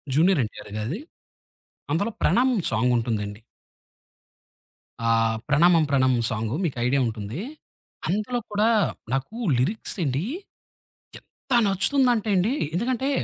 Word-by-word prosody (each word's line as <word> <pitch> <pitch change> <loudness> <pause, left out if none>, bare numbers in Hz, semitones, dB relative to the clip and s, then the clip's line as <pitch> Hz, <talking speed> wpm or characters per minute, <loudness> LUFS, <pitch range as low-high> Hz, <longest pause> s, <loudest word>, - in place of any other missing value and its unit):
Junior 170 0 +4
NTR 105 - -10
గారిది 130 - -3 0.9
అందులో 200 +8 0
'ప్రణామం' 245 -5 +2
సాంగుంటుందండి. 110 -3 0 1.7
ఆహ్, 115 0 +2
'ప్రణామం 165 +3 +5
ప్రణామం' 130 -4 +2
సాంగు. 110 +1 -2
మీకయిడియా 130 -3 0
ఉంటుందీ. 110 - -5 0.7
అందులో 215 +6 -1
కూడా 210 +2 +2 0.4
నాకు 135 - -2 0.2
లిరిక్సెండీ 155 - -1 1.0
ఎంత - - -27 0.2
నచ్చుతుందంటే 225 +3 +2
అండి, 195 +7 +2 0.2
ఎందుకంటే, 250 +8 0
155 Hz, 90 wpm, -24 LUFS, -, 1.7 s, ప్రణామం